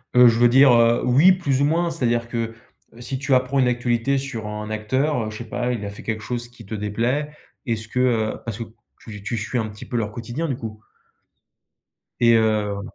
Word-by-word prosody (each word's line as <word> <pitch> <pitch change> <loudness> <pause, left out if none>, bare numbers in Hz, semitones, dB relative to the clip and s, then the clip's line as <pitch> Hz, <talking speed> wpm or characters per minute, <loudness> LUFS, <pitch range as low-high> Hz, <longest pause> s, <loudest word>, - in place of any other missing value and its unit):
Heu, 125 0 +8
je 115 0 +3
veux 120 0 +6
dire, 130 +1 +6
heu, 115 0 +4
oui 140 +9 +6
plus 145 -8 0
ou - - +4
moins 170 +3 +1
c'est 150 - -5
à 120 - +4
dire 115 0 0
que, 115 -1 -3 0.4
heu, 115 - -14
si 130 +2 -4
tu 140 +1 -1
apprends 130 +2 +2
une 130 - +4
actualité 125 +2 0
sur 130 -5 -5
un 105 0 -5
acteur, 125 +5 0
heu, - - -5
je 105 - -8
sais 120 - -7
pas, 125 +2 -1
il 115 -4 -3
a 100 - -4
fait 100 - -11
quelque 110 -1 -3
chose 120 +2 -5
qui 120 -2 -15
te 110 - -5
déplaît, 115 +8 -1 0.3
est-ce 115 -3 -3
que 125 - -3
heu 115 -4 +2
parce 115 -4 -4
que 115 - -4 0.4
tu 105 -3 -10
tu 115 +2 -3
suis 110 +4 -3
un 110 -2 -1
petit 105 0 -10
peu - - -6
leur 105 -2 -2
quotidien 120 +8 -4
du 130 - -2
coup. 110 -2 -8 1.4
et 115 0 +5
heu 105 -2 0
120 Hz, 235 wpm, -22 LUFS, 110-130 Hz, 1.4 s, Heu